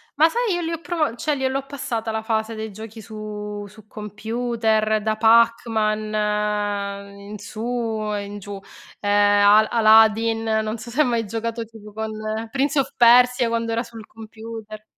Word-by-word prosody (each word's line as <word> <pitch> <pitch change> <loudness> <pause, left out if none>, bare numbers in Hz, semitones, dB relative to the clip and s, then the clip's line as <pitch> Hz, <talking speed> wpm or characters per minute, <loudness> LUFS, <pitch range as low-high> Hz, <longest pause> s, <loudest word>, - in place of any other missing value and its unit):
Ma 315 +3 +5
sai 470 0 0
io 350 - -2
li 330 0 -3
ho 330 - -3
provo 325 -8 -1
cioè 295 +4 -1
gliel'ho 265 0 -2
passata 235 -5 -4
la 220 0 -2
fase 220 0 -2
dei 220 -1 -5
giochi 220 +2 -10
su 210 -1 -7
su 210 +1 -17
computer, 220 0 -1
da 215 0 -1
Pac-Man, 225 -1 +3 1.0
mhmm, 200 - -14
in 210 - -6
su 215 +2 -10 0.5
e 205 -1 -2
in 205 +1 -8
giù. 200 0 -8 0.4
Ehm, 205 0 +3
Al 215 +1 +6
Aladdin, 225 0 +4 0.2
non 215 +1 -3
so 235 - -9
se 275 +6 +2
hai 300 - +3
mai 235 -2 0
giocato 230 +2 -4
tipo 215 -1 -14
con 220 +1 -4 0.4
Prince 275 +2 +1
of 270 - -1
Persia 245 0 +5
quando 230 0 -1
era 230 +1 0
sul 230 -2 -11
computer. 220 -1 -10
225 Hz, 170 wpm, -22 LUFS, 215-235 Hz, 1.0 s, Al